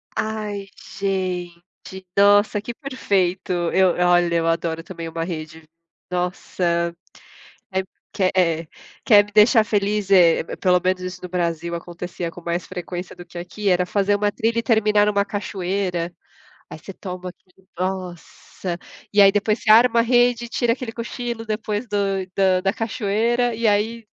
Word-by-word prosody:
Ai 210 Hz, -2 st, -3 dB, 0.3 s
gente, 185 Hz, -3 st, -2 dB, 0.5 s
nossa 205 Hz, +1 st, +4 dB
que 230 Hz, -, -5 dB
perfeito, 200 Hz, -, -1 dB, 0.2 s
eu 185 Hz, -2 st, +4 dB
olha 175 Hz, -1 st, +3 dB
eu 165 Hz, 0 st, +1 dB
adoro 165 Hz, 0 st, -1 dB
também 170 Hz, -1 st, -7 dB
uma 165 Hz, 0 st, -3 dB
rede, 160 Hz, -1 st, -6 dB, 0.5 s
nossa, 175 Hz, -1 st, -1 dB, 1.2 s
quer 185 Hz, -2 st, +1 dB
É, 165 Hz, -3 st, +1 dB, 0.4 s
quer 205 Hz, -2 st, +7 dB
me 210 Hz, -, -16 dB
deixar 215 Hz, +2 st, +6 dB
feliz 205 Hz, -2 st, 0 dB
é 175 Hz, -4 st, +6 dB
pelo 180 Hz, -1 st, +3 dB
menos 185 Hz, 0 st, +1 dB
isso 185 Hz, 0 st, -6 dB
no 180 Hz, -, -6 dB
Brasil 170 Hz, -1 st, -2 dB
acontecia 175 Hz, 0 st, -6 dB
com 175 Hz, -, -12 dB
mais 170 Hz, +1 st, -3 dB
frequência 180 Hz, 0 st, -6 dB
do 175 Hz, -, -11 dB
que 175 Hz, -, -12 dB
aqui, 195 Hz, +4 st, -3 dB
era 180 Hz, 0 st, +3 dB
fazer 200 Hz, +1 st, +1 dB
uma 205 Hz, 0 st, +1 dB
trilha 230 Hz, +2 st, 0 dB
e -, -, -3 dB
terminar 210 Hz, -2 st, +3 dB
numa 200 Hz, -1 st, +2 dB
cachoeira, 185 Hz, -4 st, -3 dB, 0.6 s
aí -, -, -8 dB
você 195 Hz, -, -10 dB
toma 185 Hz, -1 st, -7 dB
aquele 185 Hz, +1 st, -21 dB
nossa, 185 Hz, -1 st, -5 dB, 0.4 s
e 205 Hz, -, +3 dB
aí 195 Hz, 0 st, +8 dB
depois 210 Hz, +2 st, 0 dB
você 215 Hz, -, +4 dB
arma 235 Hz, +1 st, +6 dB
a -, -, 0 dB
rede 240 Hz, 0 st, +3 dB
e -, -, -11 dB
tira 235 Hz, 0 st, +1 dB
aquele 250 Hz, -2 st, -6 dB
cochilo 235 Hz, 0 st, -5 dB
depois 215 Hz, +1 st, -3 dB
do 205 Hz, -1 st, -2 dB, 0.4 s
da 190 Hz, -2 st, +3 dB
da 195 Hz, +1 st, +1 dB
cachoeira 225 Hz, +2 st, 0 dB
e 230 Hz, 0 st, 0 dB
aí 220 Hz, +2 st, 0 dB
195 Hz, 155 wpm, -22 LUFS, 175-215 Hz, 1.2 s, aí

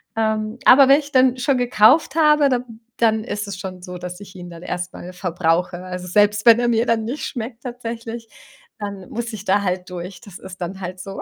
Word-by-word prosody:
Ähm, 220 Hz, +1 st, -1 dB
aber 265 Hz, +1 st, +8 dB
wenn 275 Hz, +2 st, +6 dB
ich 290 Hz, 0 st, -9 dB
dann 255 Hz, -1 st, +4 dB
schon 260 Hz, +1 st, +1 dB
gekauft 245 Hz, +6 st, +4 dB
habe, 300 Hz, -2 st, +5 dB
dann 240 Hz, -3 st, -3 dB, 0.2 s
dann 220 Hz, -2 st, +2 dB
ist 205 Hz, -3 st, -4 dB
es 195 Hz, -2 st, -6 dB
schon 185 Hz, -1 st, -7 dB
so, 180 Hz, -1 st, -8 dB
dass 180 Hz, +1 st, -7 dB
ich 195 Hz, -1 st, -12 dB
ihn 175 Hz, -1 st, -9 dB
dann 170 Hz, 0 st, -11 dB
erst 180 Hz, 0 st, -4 dB
mal 180 Hz, -, -9 dB
verbrauche. 180 Hz, 0 st, -1 dB
Also 180 Hz, 0 st, -6 dB
selbst 210 Hz, +3 st, +2 dB
wenn 230 Hz, 0 st, +8 dB
er 240 Hz, -, +1 dB
mir 230 Hz, +1 st, +2 dB
dann 230 Hz, -2 st, +1 dB
nicht 250 Hz, +7 st, -4 dB
schmeckt 235 Hz, -1 st, -6 dB
tatsächlich, 230 Hz, -2 st, -6 dB, 0.5 s
dann 200 Hz, -2 st, -7 dB
muss 235 Hz, 0 st, -5 dB
ich 205 Hz, -2 st, -7 dB
da 200 Hz, +2 st, +2 dB
halt 180 Hz, 0 st, -2 dB
durch. 180 Hz, 0 st, -8 dB
Das 200 Hz, -4 st, -11 dB
ist 190 Hz, -1 st, -11 dB
dann 190 Hz, +2 st, -5 dB
halt 185 Hz, 0 st, -6 dB
so. 195 Hz, 0 st, -8 dB
210 Hz, 220 wpm, -21 LUFS, 180-240 Hz, 0.5 s, aber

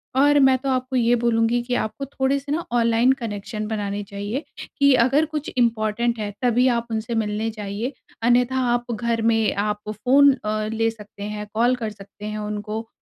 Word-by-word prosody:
और 290 Hz, +2 st, +5 dB
मैं 265 Hz, -1 st, +5 dB
तो 270 Hz, +2 st, -4 dB
आपको 255 Hz, 0 st, -1 dB
ये 240 Hz, -1 st, +3 dB
बोलूँगी 235 Hz, 0 st, +2 dB
कि 245 Hz, +1 st, -3 dB
आपको 245 Hz, +4 st, -3 dB
थोड़े-से 275 Hz, +1 st, -1 dB
ना 325 Hz, +3 st, 0 dB
ऑनलाइन 235 Hz, +1 st, +3 dB
कनेक्शन 215 Hz, -3 st, -5 dB
बनाने 205 Hz, -2 st, -3 dB
चाहिए 205 Hz, +7 st, -4 dB, 0.4 s
कि 280 Hz, -1 st, +6 dB
अगर 275 Hz, +6 st, +3 dB
कुछ 300 Hz, -1 st, -4 dB
इम्पॉर्टेंट 235 Hz, 0 st, +1 dB
है, 210 Hz, -1 st, -3 dB
तभी 250 Hz, 0 st, +3 dB
आप 235 Hz, -2 st, +1 dB
उनसे 220 Hz, +1 st, -2 dB
मिलने 215 Hz, 0 st, -1 dB
जाइए 215 Hz, +4 st, -4 dB, 0.3 s
अन्यथा 245 Hz, +2 st, +3 dB
आप 240 Hz, 0 st, -1 dB
घर 230 Hz, 0 st, -1 dB
में 225 Hz, -1 st, +2 dB
आप 210 Hz, +1 st, -1 dB
फ़ोन 265 Hz, +7 st, +5 dB
अ, 215 Hz, 0 st, -1 dB
ले 225 Hz, 0 st, +1 dB
सकते 210 Hz, -2 st, -11 dB
हैं, 210 Hz, 0 st, -4 dB
कॉल 240 Hz, +3 st, +3 dB
कर 230 Hz, -3 st, -4 dB
सकते 205 Hz, 0 st, -12 dB
हैं 215 Hz, 0 st, -4 dB
उनको 210 Hz, +1 st, -4 dB
230 Hz, 180 wpm, -23 LUFS, 215-255 Hz, 0.4 s, कि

